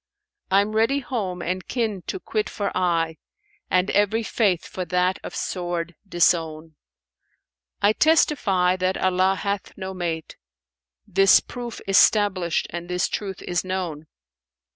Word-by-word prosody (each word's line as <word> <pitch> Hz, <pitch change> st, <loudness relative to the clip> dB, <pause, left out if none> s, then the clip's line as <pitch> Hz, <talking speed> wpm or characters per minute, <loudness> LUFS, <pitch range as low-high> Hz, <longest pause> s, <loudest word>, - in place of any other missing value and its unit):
I'm 200 Hz, +3 st, +2 dB
ready 230 Hz, +6 st, +3 dB
home 195 Hz, -9 st, -3 dB
and 185 Hz, +1 st, -3 dB
kin 220 Hz, -6 st, -2 dB
to -, -, -3 dB
quit 215 Hz, +3 st, -2 dB
for 200 Hz, -1 st, -3 dB
aye, 165 Hz, -3 st, 0 dB, 0.3 s
* 415 Hz, 0 st, -37 dB
And 185 Hz, +1 st, +2 dB
every 205 Hz, +3 st, +2 dB
Faith 200 Hz, -6 st, +1 dB
for 185 Hz, -, -5 dB
that 180 Hz, +2 st, +1 dB
of -, -, -7 dB
sword[FN#485] 175 Hz, -2 st, -3 dB, 0.2 s
disown: 165 Hz, -3 st, +1 dB, 1.1 s
I 205 Hz, +1 st, +5 dB
testify 205 Hz, -, +3 dB
that 185 Hz, +1 st, 0 dB
Allah 185 Hz, +1 st, +2 dB
hath 200 Hz, 0 st, -4 dB
no 190 Hz, -1 st, -5 dB
mate: 165 Hz, -3 st, -4 dB, 0.4 s
* -, -, -68 dB, 0.3 s
This 195 Hz, 0 st, +6 dB
proof 240 Hz, -2 st, -8 dB
is 195 Hz, 0 st, +5 dB
stablished 190 Hz, -6 st, +3 dB
and 175 Hz, +1 st, -6 dB
this 180 Hz, 0 st, 0 dB
truth 195 Hz, -3 st, -5 dB
is 175 Hz, -1 st, -1 dB
known. 180 Hz, -5 st, -4 dB
185 Hz, 140 wpm, -23 LUFS, 175-205 Hz, 1.1 s, This